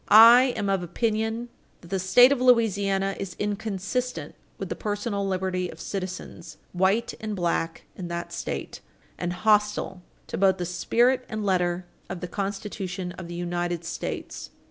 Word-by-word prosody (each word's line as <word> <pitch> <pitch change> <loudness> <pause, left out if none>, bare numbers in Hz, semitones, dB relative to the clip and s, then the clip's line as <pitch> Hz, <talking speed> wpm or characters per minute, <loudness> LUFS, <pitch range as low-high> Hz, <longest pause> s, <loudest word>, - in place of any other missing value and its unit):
I 230 +4 +10
am 200 - -1
of 195 -2 +1
opinion 220 +5 -1 0.3
that 170 - -14
the 195 0 0
statute 245 +8 +6
of 275 -3 +1
Louisiana 200 -5 +3
is 190 -2 -5
inconsistent 210 +4 -2 0.2
with - - -5
the - - -2
personal 205 -1 -2
liberty 185 -1 -1
of 160 - -11
citizens, 185 0 -6 0.2
white 190 +6 +2
and 215 -1 -4
black, 170 -2 -1
in 180 - -6
that 170 0 -5
State, - - -4 0.4
and 175 0 -1
hostile 210 -1 +1 0.2
to - - -5
both 195 -1 +4
the 180 - -2
spirit 240 +8 +2
and 215 -2 -3
letter 180 -2 +1 0.2
of 185 - -4
the 180 - -5
Constitution 195 -1 -4
of 180 -1 -8
the 175 - -7
United 175 -1 -2
States. 170 - -5
195 Hz, 155 wpm, -26 LUFS, 180-215 Hz, 0.4 s, I